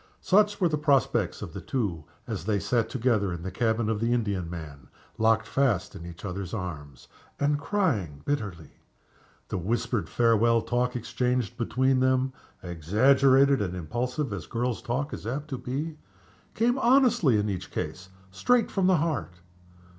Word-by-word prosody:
Such 205 +1 +3
were 180 - +4
the 155 -2 -1
prospects 145 -3 +1
of - - -8
the - - -6
two 95 - -2 0.2
as 80 - -5
they 105 -1 +1
sat 115 +4 0
together 115 -6 +1
in 85 -1 -5
the 95 - -4
cabin 110 +2 0
of 110 -1 0
the 115 +2 +1
Indiaman 85 - -3 0.3
locked 110 0 +3
fast 125 -10 0
in 85 - -8
each 85 +3 -10
other's 95 0 -4
arms, 75 - -7 0.3
and 145 0 +1
crying 140 - -1
bitterly. 100 - -4 0.7
The - - -2
whispered 115 +3 -1
farewell 115 0 +3
talk 125 +1 0
exchanged 125 -1 -1
between 130 +2 +1
them 130 0 +2 0.3
exaggerated 130 - +4
and 90 -3 -2
impulsive 120 - -3
as 95 - -6
girls' 120 0 -2
talk 135 +5 -2
is - - -6
apt 145 +5 -4
to 130 -4 -4
be 150 +5 -4 0.6
came 245 +4 +2
honestly, 240 - +4
in 105 0 0
each 95 -4 -4
case, 95 +1 -5 0.2
straight 245 - +2
from 190 -2 +1
the 185 -2 +5
heart. 150 - -2
120 Hz, 155 wpm, -27 LUFS, 95-140 Hz, 0.7 s, the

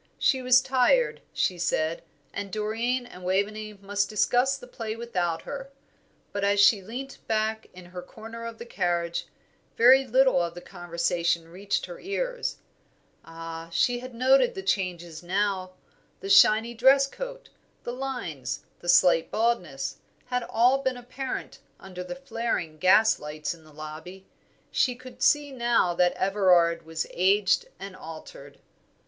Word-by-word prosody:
She 260 -2 +2
was 255 0 +5
tired, 270 - +2
she 180 -2 -1
said, 165 -1 0 0.3
and 200 -1 -5
Doreen 225 +5 -1
and 185 -7 -12
Waveney 210 +3 -1
must 200 0 -2
discuss 250 +5 +2
the 260 - -12
play 225 -3 -5
without 180 -8 -2
her; 275 -1 -7 0.6
but 200 - -3
as 200 0 +2
she 205 0 +6
leant 250 +7 -7
back 220 0 -1
in 180 -1 -13
her 180 0 -8
corner 225 +5 -10
of 230 -1 -8
the 235 - -8
carriage, 175 -6 -1 0.5
very 260 +3 +6
little 260 -5 +4
of 170 0 -3
the - - -6
conversation 170 -2 -1
reached 195 +4 -2
her 175 -1 -10
ears. - - -3 0.7
Ah, 165 0 -8
she 245 +9 +1
had 255 -1 -9
noted 265 - +4
all - - -15
the 385 - -5
changes 175 - -2
now. 185 0 -1 0.5
The 195 - -4
shiny 220 +4 +6
dress 265 +4 +5
coat, - - -8 0.3
the 240 - -4
lines, 175 - -4 0.2
the 175 - -6
slight 175 -2 +5
baldness, 175 -12 -1 0.3
had 250 0 -1
all 250 +4 +4
been 260 -2 -1
apparent 255 +2 -6 0.2
under 180 -1 -8
the 265 - -6
flaring 230 - -3
gaslights 155 -6 +3
in 165 -2 -17
the 155 - -18
lobby. 155 +5 -9 0.5
She 250 -2 +1
could 255 +1 -13
see 295 -1 +3
now 235 -8 +2
that 175 +1 +3
Everard 180 -4 +2
was 160 -1 -3
aged 195 - +2
and 195 -1 -8
altered. 160 -3 -11
205 Hz, 150 wpm, -26 LUFS, 175-250 Hz, 0.7 s, she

